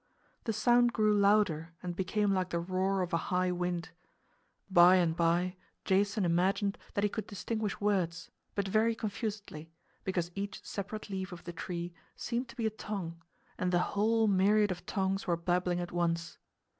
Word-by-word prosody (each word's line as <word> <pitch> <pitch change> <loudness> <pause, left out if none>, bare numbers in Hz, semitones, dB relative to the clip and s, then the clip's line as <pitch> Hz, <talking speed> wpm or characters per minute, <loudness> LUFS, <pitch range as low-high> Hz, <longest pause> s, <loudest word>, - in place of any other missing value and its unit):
The 225 - +1
sound 240 +2 +4
grew 215 -1 +3
louder 200 -6 +3
and 175 -1 -3
became 195 +2 +1
like 185 -1 0
the 170 - -1
roar 185 +2 0
of 175 0 -5
a - - +4
high 180 0 +2
wind. 175 -1 -2 0.8
By 180 -1 +7
and 170 -3 +2
by 175 +2 +1 0.3
Jason 200 +1 +2
imagined 190 +4 +1 0.2
that 200 - +1
he - - +5
could 220 - -4
distinguish 215 0 -3
words, 180 -5 0 0.2
but 200 -1 0
very 220 +3 +2
confusedly, 205 -7 -5 0.3
because 175 -2 -1
each 200 +1 -5
separate 205 +1 -5
leaf 190 0 -3
of 175 - -9
the 175 - -7
tree 175 0 -5 0.2
seemed 240 +1 -3
to - - -11
be 235 -3 -2
a 220 - +1
tongue 185 -6 -5 0.4
and 180 0 0
the 175 0 +1
whole 225 +2 +3
myriad 205 +1 +4
of 180 -1 -6
tongues 195 0 -1
were 170 -1 +2
babbling 180 +1 0
at 175 0 -4
once. 170 -1 -1
190 Hz, 170 wpm, -32 LUFS, 175-210 Hz, 0.8 s, By